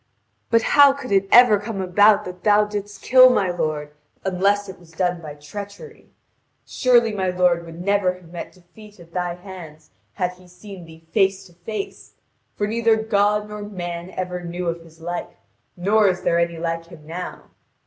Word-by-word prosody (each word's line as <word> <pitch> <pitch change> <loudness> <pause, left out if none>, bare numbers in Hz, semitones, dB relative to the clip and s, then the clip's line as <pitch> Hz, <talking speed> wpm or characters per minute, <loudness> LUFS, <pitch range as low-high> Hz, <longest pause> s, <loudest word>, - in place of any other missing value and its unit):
But 230 -1 +3
how 285 -1 +8
could 275 -4 -8
it 195 0 +3
ever 240 -4 +7
come 205 -1 -5
about 205 +3 +4
that 180 0 -9
thou 210 0 +4
didst 205 -1 -6
kill 255 0 +7
my 195 -7 +1
lord, 155 -4 -3 0.3
unless 200 +2 +1
it 190 -1 -10
was 165 -2 -19
done 180 0 -1
by 150 -3 -8
treachery? 205 - -10 0.6
Surely 240 -3 +3
my 190 -2 -1
lord 180 -2 +1
would 165 0 -10
never 190 -1 +1
have 175 -2 -17
met 175 - -7
defeat 200 +3 -17
at 170 -1 -16
thy 180 -1 -2
hands 175 -5 -12 0.2
had 180 -3 -1
he 180 0 -18
seen 180 0 -12
thee 160 0 -16
face 195 -2 +1
to 175 - -18
face. 195 +4 -7 0.4
For 205 - -1
neither 225 +1 +2
God 210 -1 +1
nor 210 0 -7
man 175 -4 -6
ever 180 -1 -4
knew 175 +1 -4
of 170 0 -4
his 165 0 -18
like, 175 +1 -5 0.4
nor 205 +4 +3
is 185 -1 0
there 170 - +2
any 170 -1 0
like 165 0 -3
him 165 -3 -14
now. 170 +3 -7
185 Hz, 180 wpm, -22 LUFS, 175-210 Hz, 0.6 s, how